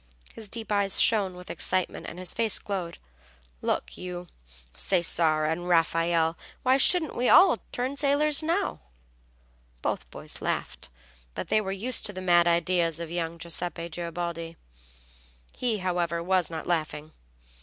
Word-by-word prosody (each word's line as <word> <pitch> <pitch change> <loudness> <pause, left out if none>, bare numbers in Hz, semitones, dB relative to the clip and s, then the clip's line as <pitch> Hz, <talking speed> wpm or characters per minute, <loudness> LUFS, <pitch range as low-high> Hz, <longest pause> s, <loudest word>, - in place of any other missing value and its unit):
His 220 -3 -9
deep 225 0 -4
eyes 200 -2 +2
shone 200 -5 +4
with 180 0 -9
excitement 185 0 0
and 170 - -8
his 185 0 -5
face 225 -2 +1
glowed. 185 -4 -4 0.6
"Look - - -2
you, 180 -1 -7 0.5
Cesare 165 -4 +2
and 170 +3 -2
Raffaelle, 165 -1 +2 0.3
why 260 +1 +4
shouldn't 320 +2 +4
we 245 - +1 0.4
turn 255 +3 -2
sailors 290 +1 +3
now?" 345 +5 -1 1.0
Both - - -2
boys - - -7
laughed; - - -3 0.5
they 215 - 0
were 190 -2 -4
used 225 +6 -1
to 205 - -7
the 185 - -6
mad 175 -2 +4
ideas 170 -1 +1
of 170 -1 -6
young 170 -1 -3
Giuseppe 170 0 -3
Garibaldi. 170 0 -5 0.9
He, 240 -4 -1
however, 175 -3 -1
was 185 -2 +1
not 160 -1 -5
laughing. 155 -2 -2
180 Hz, 135 wpm, -27 LUFS, 170-210 Hz, 1.0 s, shone